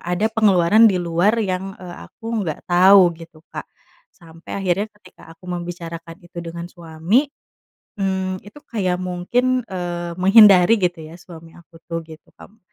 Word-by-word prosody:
ada 180 Hz, +5 st, -1 dB
pengeluaran 210 Hz, 0 st, +4 dB
di 190 Hz, -, 0 dB
luar 175 Hz, +5 st, +1 dB
yang, 195 Hz, -3 st, -3 dB
eee, 180 Hz, -2 st, -10 dB
aku 225 Hz, -1 st, -5 dB
nggak 160 Hz, -6 st, -5 dB
tau 180 Hz, 0 st, +5 dB
gitu, 165 Hz, -1 st, -15 dB
Kak. -, -, -7 dB, 0.4 s
Sampai 165 Hz, -1 st, -11 dB
akhirnya 195 Hz, +2 st, -1 dB
ketika 185 Hz, -4 st, -19 dB
aku 175 Hz, -, -23 dB
membicarakan 170 Hz, -1 st, -7 dB
itu 175 Hz, 0 st, -9 dB
dengan 170 Hz, 0 st, -7 dB
suami, 170 Hz, -, -1 dB, 0.7 s
mmm, 190 Hz, -1 st, -3 dB
itu 205 Hz, +8 st, -14 dB
kayak 185 Hz, -5 st, -2 dB
mungkin, 240 Hz, +8 st, -1 dB
eee, 175 Hz, -1 st, -5 dB
menghindari 195 Hz, 0 st, +6 dB
gitu 175 Hz, -3 st, -2 dB
ya 160 Hz, -, -12 dB
suami 165 Hz, -2 st, -14 dB
aku 170 Hz, -1 st, -18 dB
tuh 165 Hz, -1 st, -4 dB
gitu 160 Hz, -1 st, -16 dB
kam. 220 Hz, -, -17 dB
180 Hz, 150 wpm, -20 LUFS, 170-195 Hz, 0.7 s, menghindari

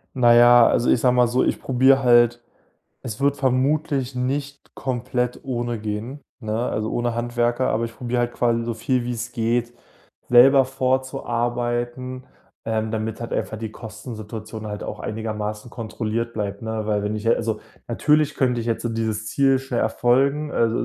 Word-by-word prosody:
Na 120 Hz, -2 st, +5 dB
ja, 120 Hz, 0 st, +7 dB
also, 120 Hz, -, +2 dB
ich -, -, +3 dB
sage 125 Hz, -1 st, +3 dB
mal 125 Hz, -1 st, +4 dB
so, 125 Hz, +2 st, +1 dB
ich -, -, 0 dB
probiere 130 Hz, +1 st, +3 dB
halt 120 Hz, -1 st, +5 dB, 0.6 s
es 115 Hz, -4 st, -6 dB
wird 140 Hz, 0 st, +2 dB
vermutlich 135 Hz, 0 st, 0 dB
nicht 140 Hz, +3 st, -4 dB
komplett 125 Hz, -1 st, -2 dB
ohne 120 Hz, -3 st, -3 dB
gehen, 110 Hz, +6 st, -5 dB, 0.2 s
ne? 110 Hz, -3 st, -3 dB
Also, 110 Hz, +1 st, -2 dB
ohne 120 Hz, -1 st, -1 dB
Handwerker, 120 Hz, +1 st, 0 dB
aber 115 Hz, -, 0 dB
ich 115 Hz, -1 st, -7 dB
probiere 125 Hz, 0 st, -1 dB
halt 120 Hz, 0 st, -1 dB
quasi 115 Hz, -1 st, +1 dB
so 115 Hz, 0 st, -3 dB
viel, 125 Hz, +3 st, 0 dB
wie's 120 Hz, 0 st, -4 dB
geht, 120 Hz, +1 st, 0 dB, 0.6 s
selber 135 Hz, +3 st, +7 dB
vorzuarbeiten, 125 Hz, -1 st, -2 dB, 0.4 s
ähm, 110 Hz, -1 st, -1 dB
damit 110 Hz, 0 st, -3 dB
halt 115 Hz, -, -6 dB
einfach -, -, -2 dB
die 110 Hz, -1 st, -6 dB
Kostensituation 110 Hz, -1 st, -8 dB
halt 105 Hz, 0 st, -5 dB
auch -, -, -6 dB
einigermaßen 105 Hz, 0 st, -4 dB
kontrolliert 115 Hz, 0 st, -3 dB
bleibt, 100 Hz, -2 st, -3 dB
ne? 110 Hz, -1 st, -3 dB
Weil 105 Hz, -1 st, 0 dB
wenn 105 Hz, +1 st, -2 dB
ich 105 Hz, -, -6 dB
äh, 115 Hz, -, +5 dB
also, 110 Hz, -2 st, -2 dB, 0.3 s
natürlich 150 Hz, +5 st, +2 dB
könnte 125 Hz, -3 st, +1 dB
ich 115 Hz, -, -5 dB
jetzt 115 Hz, 0 st, -1 dB
dieses 110 Hz, -1 st, -2 dB
Ziel 135 Hz, +3 st, +3 dB
schnell 130 Hz, -2 st, -3 dB
erfolgen, 135 Hz, +6 st, +1 dB
äh, 115 Hz, -, +2 dB
s -, -, -1 dB
120 Hz, 170 wpm, -22 LUFS, 110-130 Hz, 0.6 s, ja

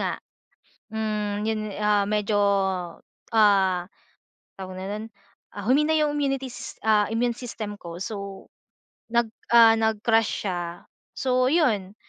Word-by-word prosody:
nga, -, -, -1 dB, 0.7 s
hmm, 210 Hz, -1 st, -2 dB
'yun, 220 Hz, -1 st, 0 dB, 0.2 s
ah, 210 Hz, -1 st, +2 dB
medyo, 210 Hz, 0 st, +1 dB, 0.9 s
ah, 195 Hz, -5 st, +3 dB, 0.7 s
tawag 185 Hz, -1 st, -8 dB
na 190 Hz, -, -5 dB
nun 210 Hz, +2 st, -4 dB, 0.5 s
ah, 205 Hz, -, -8 dB
humina 295 Hz, +5 st, +3 dB
'yung 300 Hz, -1 st, +1 dB
immunity 275 Hz, -2 st, -1 dB
sys -, -, -9 dB
ah, 210 Hz, -1 st, +3 dB
immune 235 Hz, +1 st, 0 dB
system 225 Hz, -4 st, -6 dB
ko. 170 Hz, 0 st, -8 dB
So 200 Hz, -1 st, -6 dB, 0.6 s
nag 235 Hz, -1 st, +1 dB, 0.2 s
ah, 230 Hz, -1 st, +8 dB
nag 220 Hz, -1 st, 0 dB
crash 225 Hz, -2 st, +2 dB
siya. 175 Hz, -2 st, -4 dB, 0.3 s
So 255 Hz, -1 st, +1 dB
'yun, 220 Hz, -, +1 dB
215 Hz, 130 wpm, -25 LUFS, 200-235 Hz, 0.9 s, ah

